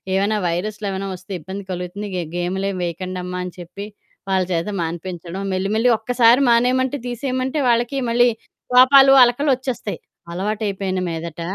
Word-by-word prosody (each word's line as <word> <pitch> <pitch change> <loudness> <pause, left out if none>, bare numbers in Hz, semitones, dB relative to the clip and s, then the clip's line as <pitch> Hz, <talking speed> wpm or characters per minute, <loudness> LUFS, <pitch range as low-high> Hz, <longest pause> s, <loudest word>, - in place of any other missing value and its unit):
ఏమైనా 205 +2 +1
వైరస్లు 205 +5 -3
ఏమైనా 195 +1 -4
వస్తే 190 +2 -14
ఇబ్బంది 190 +5 -7
కలుగుతుంది 180 +3 -5
గే 180 - -1
గేములేం 190 +3 -2
వేయకండమ్మా 180 +1 -4
అని 180 - -6
చెప్పి 175 +4 -8 0.4
వాళ్ళ 190 -1 +2
చేత 170 +3 -1
మానిపించడం 175 +2 -5
మెల్లి, 190 +1 -1
మెల్లి 230 +3 +3
ఒక్కసారి 240 +2 +4
మానేయమంటే 255 +3 +2
తీసేయమంటే 255 +3 -2
వాళ్ళకి 240 +3 +1
మళ్ళీ 240 +1 +4 0.4
కోపాలు, 270 +2 +7
అలకలొచ్చేస్తాయి 255 -3 0 0.3
అలవాటు 210 +5 -2
అయిపోయిన 190 -1 -2
మీదట. 165 0 -6
200 Hz, 135 wpm, -20 LUFS, 180-245 Hz, 0.4 s, కోపాలు